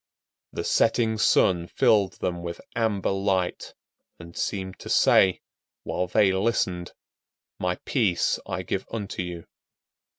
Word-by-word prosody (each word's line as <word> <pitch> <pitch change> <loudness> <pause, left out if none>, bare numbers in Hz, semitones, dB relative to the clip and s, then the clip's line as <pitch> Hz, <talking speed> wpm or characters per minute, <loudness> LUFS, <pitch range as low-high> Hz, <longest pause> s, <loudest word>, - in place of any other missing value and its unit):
The - - -4
setting 115 -1 +2
sun 85 -4 +3
filled 105 -6 +3
them 85 -1 -3
with 85 0 -6 0.2
amber 110 -4 0
light, 95 -2 -1 0.4
and 85 0 -12
seemed 95 -1 -3
to - - -9
say, 95 -1 +4 0.4
while 90 - -2
they 100 +1 +3
listened, 95 -4 -1 0.7
"My 90 0 0
peace 105 -10 +1
I 95 - -3
give 95 +1 -3
unto 105 -4 -4
you." 90 -2 -6
95 Hz, 125 wpm, -25 LUFS, 90-105 Hz, 0.7 s, say